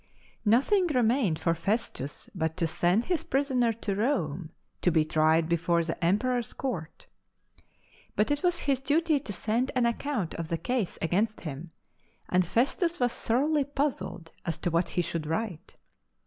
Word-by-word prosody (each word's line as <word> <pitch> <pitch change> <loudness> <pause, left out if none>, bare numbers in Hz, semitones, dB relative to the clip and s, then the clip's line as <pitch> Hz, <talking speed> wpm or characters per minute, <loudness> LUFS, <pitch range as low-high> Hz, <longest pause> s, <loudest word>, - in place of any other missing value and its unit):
Nothing 280 - +4
remained 245 - +2
for 165 +1 +1
Festus 170 - -2
but 160 -3 -2
to 175 - +1
send 175 +7 +2
his 350 -4 0
prisoner 260 -4 +1
to 215 -2 -3
Rome 185 - -1 0.3
to - - +3
be 160 -2 +3
tried 160 +1 +3
before 170 0 +2
the 165 +1 -4
Em 175 +4 +4
peror's 250 0 -1
court. 180 - -5 1.1
But 210 +6 +2
it 290 - +1
was 355 -1 +1
his 275 -3 +1
duty 300 +3 +2
to 270 - -5
send 225 +6 0
an 250 -1 +3
account 235 - -1
of 165 -1 -4
the 165 - -1
case 245 -1 -2
against 205 +7 0
him, 155 +1 -6 0.6
and 185 0 +3
Festus 280 - +1
was 245 -1 +2
thoroughly 285 +6 +1
puzzled 265 - -3
as 170 -3 -2
to 175 - +2
what 170 +2 +1
he 175 - 0
should 165 -2 -3
write. 175 0 -3
210 Hz, 160 wpm, -28 LUFS, 170-265 Hz, 1.1 s, Nothing